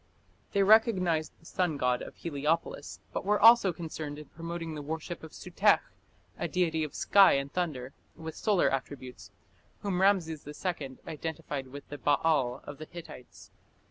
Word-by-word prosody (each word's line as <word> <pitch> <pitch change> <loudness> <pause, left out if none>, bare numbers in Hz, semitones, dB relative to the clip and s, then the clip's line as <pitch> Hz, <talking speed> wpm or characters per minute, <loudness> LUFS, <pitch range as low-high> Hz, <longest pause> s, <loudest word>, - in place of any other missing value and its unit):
They 200 - +4
recognized 190 -7 +4
the 165 - -23
sun 175 -3 -1
god 125 -2 +1
of - - -8
Heliopolis, 155 -1 -2
but - - -2
were 210 +1 +2
also 225 -3 +7
concerned 155 -4 -6
in 150 - -9
promoting 165 0 -5
the 150 - -5
worship 160 +3 -5
of 160 - -10
Sutekh, - - +2 0.6
a - - -1
deity 165 -3 0
of 150 - -5
sky 200 -1 +6
and 140 0 -1
thunder, 140 -7 -2 0.2
with 160 0 -7
solar 205 -5 +2
attributes, 130 -7 -5 0.5
whom 190 -3 -1
Rameses 170 -7 +2
II 150 -3 -4
identified 155 -4 -5
with 140 +2 -10
the 145 - -7
"Baal" 140 -4 +2
of 145 0 -9
the 155 - -6
Hittites. 165 -7 -12
160 Hz, 155 wpm, -30 LUFS, 145-180 Hz, 0.6 s, also